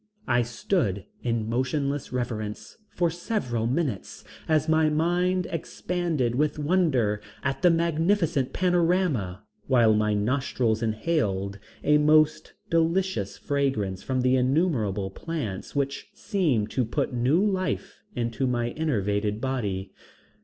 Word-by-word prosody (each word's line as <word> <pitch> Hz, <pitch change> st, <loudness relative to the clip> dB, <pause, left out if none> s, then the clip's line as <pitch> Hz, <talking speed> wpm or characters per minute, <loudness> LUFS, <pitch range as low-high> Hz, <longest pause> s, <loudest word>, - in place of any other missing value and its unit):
I 120 Hz, -1 st, +3 dB
stood 120 Hz, -, -1 dB, 0.2 s
in 115 Hz, -3 st, -1 dB
motionless 140 Hz, +4 st, -1 dB
reverence 115 Hz, -4 st, -4 dB
for 175 Hz, -2 st, 0 dB
several 160 Hz, -, -2 dB
minutes 130 Hz, -, -2 dB, 0.3 s
as 155 Hz, 0 st, +3 dB
my 160 Hz, -1 st, +4 dB
mind 175 Hz, +4 st, +1 dB
expanded 165 Hz, -5 st, -1 dB
with 150 Hz, +4 st, +1 dB
wonder 145 Hz, -, +1 dB, 0.2 s
at 135 Hz, 0 st, -1 dB
the 180 Hz, -, +6 dB
magnificent 165 Hz, -3 st, +1 dB
panorama, 175 Hz, -, +1 dB, 0.2 s
while 120 Hz, -4 st, +5 dB
my 105 Hz, 0 st, +2 dB
nostrils 115 Hz, 0 st, 0 dB
inhaled 110 Hz, -, -1 dB, 0.2 s
a 150 Hz, 0 st, +4 dB
most 155 Hz, +1 st, +3 dB, 0.2 s
delicious 165 Hz, -, +1 dB
fragrance 130 Hz, -10 st, -1 dB
from 130 Hz, -1 st, -1 dB
the 130 Hz, +1 st, +3 dB
innumerable 125 Hz, -, +1 dB
plants 140 Hz, -, -5 dB
which 140 Hz, -1 st, -2 dB
seemed 155 Hz, -, 0 dB
to 130 Hz, -, +1 dB
put 130 Hz, +4 st, -2 dB
new 125 Hz, +7 st, +2 dB
life 190 Hz, -2 st, -2 dB
into 120 Hz, +2 st, -1 dB
my 120 Hz, -1 st, 0 dB
enervated 105 Hz, -8 st, -1 dB
body. 105 Hz, -8 st, -3 dB
135 Hz, 115 wpm, -26 LUFS, 110-165 Hz, 0.3 s, the